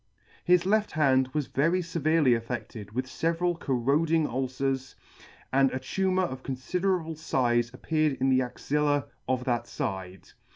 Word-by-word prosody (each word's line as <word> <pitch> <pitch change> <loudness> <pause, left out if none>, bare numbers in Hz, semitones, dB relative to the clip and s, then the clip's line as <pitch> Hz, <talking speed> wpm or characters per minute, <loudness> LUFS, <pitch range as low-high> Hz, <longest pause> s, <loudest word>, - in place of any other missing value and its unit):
His 180 0 +4
left 210 +2 +1
hand 130 -4 +3
was 150 0 -1
very 165 +8 +1
feverely 160 -4 +2
aflFe< 115 -1 +3
5 120 0 -4
ted 105 -3 -9
with 130 +2 -1
feveral 165 +5 -1
corroding 150 +5 +1
ulcers, 130 0 -2 0.6
and 135 0 +5
a - - -2
tumour 185 +7 0
of 130 -5 -6
confiderable 165 +6 -1
fize 120 -6 0
appeared 155 +3 0
in 135 +1 0
the 130 0 +4
axilla 145 +3 0 0.2
of 130 -1 0
that 120 -2 -1
fide. 95 -8 -5
135 Hz, 150 wpm, -28 LUFS, 130-165 Hz, 0.6 s, and